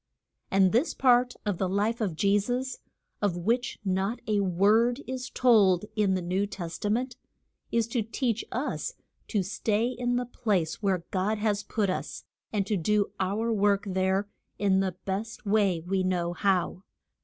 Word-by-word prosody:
And 190 -1 +4
this 245 +9 +1
part 250 -1 +4
of 205 -4 -1
the 190 - 0
life 210 +5 0
of 190 -7 -1
Je 200 +4 +3
sus 250 +5 -3 0.4
of 200 -4 +1
which 235 +7 0
not 195 +5 0
a 210 -1 +1
word 210 +8 +3
is 255 0 -5
told 210 -7 +4
in 205 -3 +2
the 185 - -2
New 185 +3 0
Test 175 -4 -7
a - - +1
ment 245 +4 -1 0.5
is 230 -1 +2
to 235 0 0
teach 230 +1 -1
us 295 - -3 0.3
to 205 -4 0
stay 210 +3 0
in 245 0 -1
the 245 0 0
place 200 -9 -1
where 190 -4 +1
God 200 +3 0
has 210 -1 0
put 205 -2 -1
us, - - -5 0.3
and 205 -3 0
to 205 0 0
do 205 +4 +1
our 215 +5 0
work 205 -1 +2
there 190 +1 0 0.3
in 195 -2 +3
the 190 -2 -1
best 205 +4 -4
way 200 -5 +2
we 190 +3 -1
know 175 -2 0
how. 185 -1 0
205 Hz, 170 wpm, -28 LUFS, 190-230 Hz, 0.5 s, And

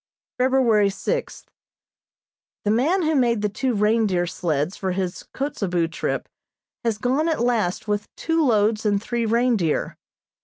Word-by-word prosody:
February 250 -6 +3
sixth: 475 - -4 1.1
The 205 - +2
man 310 - +2
who 315 0 +1
made 235 -6 +2
the 210 - +1
two 245 +4 -1
reindeer 210 -4 +2
sleds 165 -1 -2
for 190 -2 -2
his 185 -1 -3
Kotzebue 180 - -1
trip 170 - -3 0.6
has 230 -3 0
gone 265 +8 +1
at 320 - 0
last 220 -6 0
with 205 0 -2
two 325 -1 0
loads 215 -4 +2
and 205 -2 +2
three 235 +1 -2
reindeer. 230 -8 +1
220 Hz, 140 wpm, -23 LUFS, 195-255 Hz, 1.1 s, February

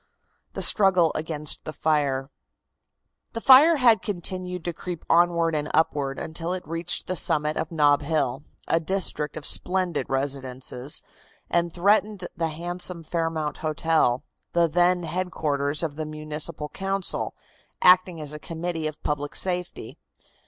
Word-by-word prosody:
THE - - +1
STRUGGLE 185 -6 +5
AGAINST 155 -1 -3
THE 155 - -6
FIRE. 145 -4 0 1.0
The 230 - -3
fire 280 +7 +8
had 235 -5 +5
continued 180 -3 -4
to 175 - -2
creep 175 0 -7
onward 170 -1 +3
and 150 -1 -2
upward 145 -3 +1
until 165 +2 -3
it 185 -4 -6
reached 165 +2 -2
the 185 - -3
summit 150 -2 +2
of 160 - -3
Nob 145 -3 +3
Hill, 145 -3 -1 0.3
a 165 - +2
district 165 -4 -1
of 150 - -6
splendid 180 -4 0
residences, 135 0 -2 0.5
and 170 0 +1
threatened 200 +1 +1
the 165 -1 -1
handsome 175 +2 -4
Fairmount 160 -2 -2
Hotel, 155 -5 +1 0.3
then 175 +2 +3
the - - -6
headquarters 155 -4 -2
of 150 -3 -3
the 155 -1 -4
Municipal 155 0 -4
Council, 195 +1 -2 0.5
acting 180 -2 +5
as 150 -1 -5
a 150 - -7
Committee 165 0 -4
of 155 0 -8
Public 145 -1 -3
Safety. 180 -1 -4
165 Hz, 140 wpm, -25 LUFS, 150-180 Hz, 1.0 s, fire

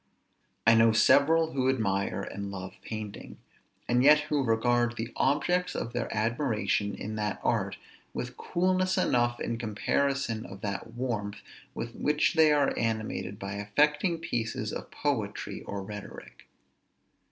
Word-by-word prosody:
I 115 - +7
know 115 0 +5
several 160 +8 +5
who 130 -1 +1
admire 100 -6 0
and 100 0 -5
love 95 -1 -6
painting, 110 -2 -7 0.5
and 120 +1 +3
yet 150 +2 +8
who 150 -2 0
regard 120 0 +2
the 115 +2 -4
objects 175 +6 +1
of 115 - -3
their 120 -1 -2
admiration 110 -3 0
in 110 +1 -5
that 105 -2 -2
art - - 0 0.3
with 125 0 -5
coolness 185 +3 +1
enough 120 -8 +2
in 115 -1 -3
comparison 115 +2 0
of 95 -4 -10
that 105 +3 -4
warmth 110 -5 -3 0.3
with 115 0 -5
which 150 +4 +1
they 160 -2 +5
are 145 -2 +3
animated 110 -3 -2
by 100 -1 -5
affecting 150 - +1
pieces 120 -9 -3
of - - -6
poetry 115 -9 -2
or 100 -1 -5
rhetoric. 105 0 -10
115 Hz, 140 wpm, -29 LUFS, 105-145 Hz, 0.5 s, yet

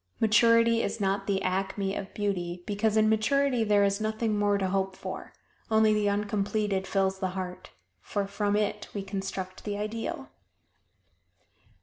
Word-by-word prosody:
Maturity 230 +1 +5
is 230 - -2
not 195 0 0
the 195 -1 0
acme 195 +1 -1
of 195 -1 -5
beauty, 180 -4 -2
because 215 +1 0
in 215 0 +5
maturity 245 +3 +2
there 205 -1 +4
is 200 +1 +1
nothing 215 0 0
more 205 -1 +2
to 195 -1 0
hope 190 0 -1
for - - -7 0.4
only 220 -1 +4
the 210 -1 +2
uncompleted 205 -1 -1
fills 190 -1 0
the 190 -1 -1
heart, 180 -1 -6 0.3
for 200 - -2
from 205 +1 -1
it 210 0 -1
we 200 - -2
construct 195 -1 -5
the 205 -1 -3
Ideal. 215 +2 -4
205 Hz, 150 wpm, -28 LUFS, 195-215 Hz, 0.4 s, Maturity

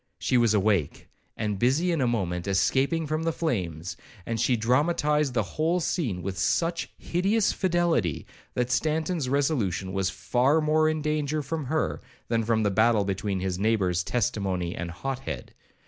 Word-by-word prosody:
She - - 0
was 115 -3 +4
awake, 100 -7 0 0.3
and 105 -3 -2
busy 145 - +2
in 165 -4 0
a 125 - +2
moment 90 -6 -1
escaping 135 - +1
from 155 +1 -1
the 165 0 0
flames; 90 - -3 0.3
and 115 -1 -2
she 125 +1 +3
dramatized 145 +3 +1
the 110 - +2
whole 160 - 0
scene 120 - -2
with 95 -1 -4
such 170 - 0
hideous 195 +5 +1
fidelity, 170 - +1 0.3
that 125 0 0
Stanton's 155 0 0
resolution 125 - 0
was 95 -1 0
far 135 +6 +2
more 155 0 +3
in 155 -1 -2
danger 150 0 -1
from 155 +1 -3
her 155 +4 -1 0.3
than 115 -1 +1
from 110 0 +1
the 105 - +2
battle 110 0 +3
between 95 0 -2
his 95 -1 -2
neighbours 95 -5 +1
Testimony 95 -7 -1
and 85 - -4
Hothead. 110 - -5
125 Hz, 160 wpm, -26 LUFS, 100-155 Hz, 0.3 s, was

